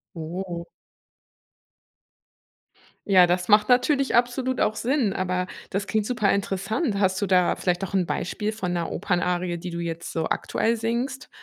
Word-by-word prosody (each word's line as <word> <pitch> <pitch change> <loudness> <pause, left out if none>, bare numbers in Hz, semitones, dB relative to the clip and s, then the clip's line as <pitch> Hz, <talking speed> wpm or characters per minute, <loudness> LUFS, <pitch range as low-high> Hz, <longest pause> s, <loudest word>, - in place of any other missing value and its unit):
Oh. 170 +1 -5 2.4
Ja, 185 -3 +6
das 180 +1 0
macht 210 0 +5
natürlich 270 +2 +3
absolut 245 +2 +1
auch 215 - +1
Sinn, 250 -4 +1
aber 180 -1 -1 0.2
das 195 +1 -2
klingt 215 0 0
super 215 -5 +1
interessant. 200 - -1
Hast 190 -1 +1
du - - +2
da 185 -2 +3
vielleicht 180 0 -1
auch 195 - -7
'n 185 -2 +2
Beispiel 210 +6 -2
von 190 -5 -3
'ner 170 -1 -2
Opernarie, 180 -1 -1
die 175 +2 -6
du 170 0 -4
jetzt 170 0 -5
so 160 -1 -1
aktuell 230 +1 0
singst? 240 +4 -3
195 Hz, 150 wpm, -25 LUFS, 180-225 Hz, 2.4 s, Ja